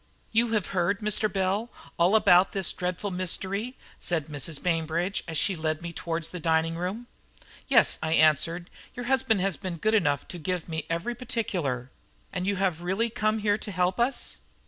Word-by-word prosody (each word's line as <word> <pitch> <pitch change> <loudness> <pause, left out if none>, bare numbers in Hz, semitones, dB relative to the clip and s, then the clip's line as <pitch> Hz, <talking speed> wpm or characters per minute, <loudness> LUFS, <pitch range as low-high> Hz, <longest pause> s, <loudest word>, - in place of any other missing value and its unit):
"You 230 +1 +2
have 210 -4 0
heard, 190 +2 0
Mr. 210 0 +2
Bell, 195 +4 0 0.3
all 175 +5 +5
about 185 -3 +5
this 195 -2 +1
dreadful 180 +2 -3
mystery?" 190 +6 -2 0.2
said 160 -3 -1
Mrs. 145 +1 -4
Bainbridge 170 +2 0
as 165 - -2
she 190 +5 +1
led 155 0 -2
me 170 0 -5
towards 165 -1 -2
the 180 - -6
dining 165 0 +1
room. 185 +8 -3 0.6
"Yes," - - +4
I 160 0 0
answered; 165 +3 +3 0.2
"your 245 -1 -5
husband 260 -5 +2
has 195 -2 +1
been 185 -4 -5
good 215 +6 +1
enough 145 -10 +2
to 175 - -6
give 180 +2 -3
me 160 -2 -4
every 170 +8 -1
particular." 180 - -2 0.4
"And 180 - -2
you 200 - +1
have 185 -3 0
really 195 +6 0
come 215 -1 +1
here 210 0 +1
to 205 - -5
help 180 +2 0
us?" 245 +3 0
180 Hz, 180 wpm, -27 LUFS, 165-210 Hz, 0.6 s, all